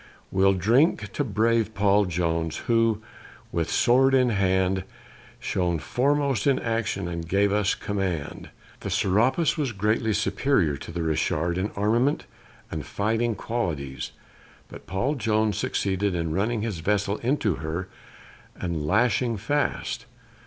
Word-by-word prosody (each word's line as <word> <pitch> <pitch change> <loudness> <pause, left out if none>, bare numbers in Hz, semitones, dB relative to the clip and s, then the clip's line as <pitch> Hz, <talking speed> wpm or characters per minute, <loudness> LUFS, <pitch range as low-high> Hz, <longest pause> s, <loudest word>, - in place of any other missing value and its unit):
We'll 95 +1 +4
drink 110 - +2
to 145 - 0
brave 110 -1 +1
Paul 100 0 +3
Jones, 85 -2 -1
who, 115 -3 +2 0.5
with 85 -1 -1
sword 135 +2 +4
in 125 -1 +4
hand, 95 -2 +1 0.6
Shone 90 -2 0
foremost 140 - 0
in 135 - +4
action, 115 -5 -2
and 85 -1 -5
gave 100 +2 +2
us 105 -1 +2
command. 95 -7 -3 0.3
The - - -5
Serapis 130 - +2
was 140 -5 0
greatly 105 +2 +1
superior 100 - +1
to 70 - -9
the 85 0 -3
Richard 80 +1 0
in 100 +3 -1
armament 115 +8 +1 0.5
and 80 -2 -4
fighting 110 - -1
qualities, 75 - -3 0.6
but - - -12 0.3
Jones 110 -3 +1
succeeded 95 -1 0
in 80 -2 -1
running 105 +4 0
his 105 -7 -3
vessel 100 +3 0
into 115 - 0
her 80 +6 -4 0.7
and 85 -4 -3
lashing 115 +3 +2
fast. 145 +8 -2
100 Hz, 130 wpm, -25 LUFS, 90-115 Hz, 0.7 s, We'll